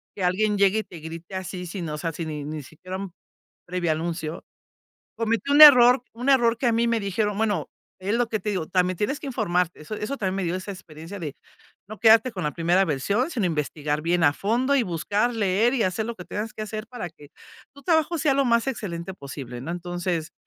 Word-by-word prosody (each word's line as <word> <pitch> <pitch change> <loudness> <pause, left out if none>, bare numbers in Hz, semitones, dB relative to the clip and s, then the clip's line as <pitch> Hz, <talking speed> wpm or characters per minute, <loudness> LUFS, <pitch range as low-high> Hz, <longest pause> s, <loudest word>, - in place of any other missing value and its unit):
que 195 - -4
alguien 205 +4 +1
llegue, 200 +2 +4
y - - -2
te 170 - -11
grite 165 +4 -8
así, 185 -1 -5
sino 170 -4 -5
o - - -6
sea, 165 +2 -2
si 165 +1 -5
ni 150 -2 -5
ni 150 0 -5
siquiera 180 +7 -8
un 195 -2 -6 0.6
previo 175 -2 -1
anuncio. 160 0 -4 0.7
Cometí 230 +4 -1
un 290 +2 +8
error 250 -3 +9
un 245 +4 -5
error 240 -4 +4
que 260 - 0
a 235 - +3
mí 230 +1 +2
me 230 -1 +1
dijeron, 205 +1 -1
bueno, 215 -2 0 0.3
es 195 +3 -2
lo 240 0 +1
que 220 - -1
te 210 - -2
digo, 185 -6 -2
también 180 +1 +1
tienes 270 +8 -1
que - - -7
informarte. 180 - -1
Eso 155 +8 -6
eso 215 +6 -4
también 190 -2 -1
me 195 - -1
dio 170 0 -1
esa 185 +2 -5
experiencia 175 0 -9
de 150 -6 -5 0.5
no 215 0 -8
quedarte 225 +3 +5
con 190 - -5
la 150 - -1
primera 175 +3 +2
versión, 200 - 0
sino 230 - 0
investigar 150 -2 -2
bien 170 +1 +2
a 145 - +5
fondo, 245 - +1
y 265 - +3
buscar 205 +5 -1
leer, 220 +4 +2
y 240 - +1
hacer 190 +4 -1
lo 235 - -4
que 180 - -9
tengas 215 +1 -4
que 215 - -5
hacer 215 +1 -5
para 245 -8 -6
que 150 -2 -16 0.5
tu 280 - -15
trabajo 325 0 +2
sea 290 -2 +2
lo 275 0 +2
más 235 -1 +2
excelente 190 -8 -4
posible, 135 -6 -8
¿no? 155 - -5
Entonces, 175 -1 -3
195 Hz, 225 wpm, -25 LUFS, 170-230 Hz, 0.7 s, error